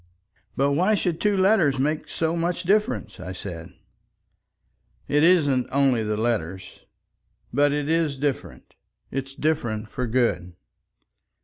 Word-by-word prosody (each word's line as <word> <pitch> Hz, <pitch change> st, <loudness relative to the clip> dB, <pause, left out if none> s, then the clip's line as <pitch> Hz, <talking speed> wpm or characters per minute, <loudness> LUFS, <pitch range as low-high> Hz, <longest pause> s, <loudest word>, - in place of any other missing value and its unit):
"But 140 Hz, +1 st, +2 dB
why 185 Hz, +9 st, +2 dB
should 175 Hz, -4 st, -2 dB
two 205 Hz, -1 st, +2 dB
letters 190 Hz, -8 st, +3 dB
make 150 Hz, +4 st, -1 dB
so 165 Hz, 0 st, -1 dB
much 170 Hz, +2 st, -1 dB
difference?" 180 Hz, -, 0 dB
I 90 Hz, -, -6 dB
said. 85 Hz, -3 st, -8 dB, 1.4 s
"It 150 Hz, +1 st, +2 dB
isn't 145 Hz, -8 st, +3 dB
only 135 Hz, -4 st, +2 dB
the 105 Hz, -1 st, -2 dB
letters. 95 Hz, -6 st, -3 dB, 0.7 s
But 145 Hz, +2 st, +3 dB
it 145 Hz, 0 st, -1 dB
is 160 Hz, -3 st, +1 dB
different. 140 Hz, -1 st, -4 dB, 0.4 s
It's 135 Hz, 0 st, -5 dB
different 120 Hz, -9 st, -1 dB
for 125 Hz, -2 st, -3 dB
good." 110 Hz, -7 st, 0 dB
140 Hz, 125 wpm, -24 LUFS, 120-165 Hz, 1.4 s, letters